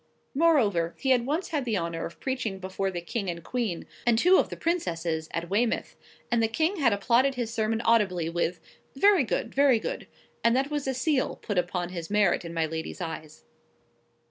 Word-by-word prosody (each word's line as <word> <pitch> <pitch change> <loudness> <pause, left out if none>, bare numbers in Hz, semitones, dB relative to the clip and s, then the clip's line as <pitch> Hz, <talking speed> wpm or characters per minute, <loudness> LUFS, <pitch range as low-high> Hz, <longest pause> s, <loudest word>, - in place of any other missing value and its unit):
Moreover, 230 - +3
he 265 - 0
had 245 -1 +3
once 315 +6 -1
had 300 -4 -1
the 230 -4 0
honour 170 -1 -3
of 170 - -15
preaching 255 -7 -2
before 190 +1 -3
the 175 -2 -4
King 195 +2 -3
and 170 -1 -5
Queen, 225 -8 -2 0.2
and 240 -2 +3
two 360 +9 +6
of - - +1
the - - -7
Princesses, 165 - -1
at 170 +1 -3
Weymouth; 220 +6 0 0.4
and 235 -1 +3
the 225 - +3
King 320 - 0
had 270 -7 +3
applauded 245 +6 +2
his 235 -2 -3
sermon 225 0 0
audibly 200 -8 +2
with,—"Very 180 - +1
good; 230 -1 -2
very 275 -3 +5
good;" 220 - -5 0.4
and 230 +1 +4
that 270 +3 0
was 290 -2 -2
a 265 - 0
seal 270 0 0
put 205 -4 -2
upon 175 0 -2
his 170 -3 -6
merit 205 -3 +2
in 170 - -6
my 165 -1 0
lady's 160 +3 -5
eyes. 155 -3 -7
220 Hz, 195 wpm, -27 LUFS, 175-265 Hz, 0.4 s, two